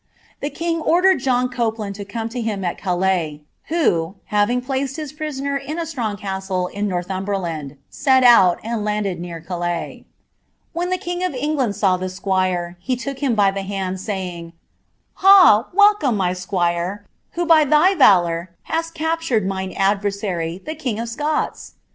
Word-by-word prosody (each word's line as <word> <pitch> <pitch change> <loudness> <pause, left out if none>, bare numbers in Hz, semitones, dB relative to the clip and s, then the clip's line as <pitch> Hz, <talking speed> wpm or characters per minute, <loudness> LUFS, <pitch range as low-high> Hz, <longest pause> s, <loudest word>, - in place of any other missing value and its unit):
The 285 - -3
king 330 +3 -2
then - - -7
ordered 370 +1 +4
John 250 -1 +1
Copeland 225 -4 -2
to 200 0 -8
come 225 +3 -4
to 240 +1 -4
him 210 -4 -3
at 175 - -1
Calais, 175 -5 -1 0.2
who, 190 - 0 0.2
mwkig 235 +4 +1
plaoNl 270 0 -2
his 300 -3 -6
prisoner 280 -2 -3
in 275 +4 -6
a 335 - -2
strong 235 -10 -3
castle 190 -2 -3
in 205 +1 -3
Northumberland, 180 -5 -3
set 265 -2 +3
out, 195 -8 +6
nd 230 -2 -2
landed 210 -4 -2
near 170 -1 -6
Calais. 175 0 -4 0.7
When 345 +2 -2
the 370 - 0
king 355 0 -4
of 365 -7 -1
England 265 -5 -1
saw 190 -3 +2
the 185 +1 -4
squire, 185 -2 -1
he 255 +8 -1
ook 275 -1 -4
him 270 -5 +1
by 200 -2 +4
the 195 0 -4
hand, 190 -1 -4
saying, 185 -4 -4
^ - - -15 0.7
Ha! 375 - +7
welcome, 405 - +4
my 180 -2 +1
squire, 180 +1 -2 0.3
who 345 0 -1
by 325 -2 +6
thy 305 +6 +4
rulour 175 - +4 0.2
hast 330 +1 -3
captured 320 - 0
mine 190 -1 -3
adversary, 195 -4 -1
the 310 - -4
king 255 -9 -3
of 230 0 -4
Scots 295 +6 -3
210 Hz, 165 wpm, -20 LUFS, 185-285 Hz, 0.7 s, Ha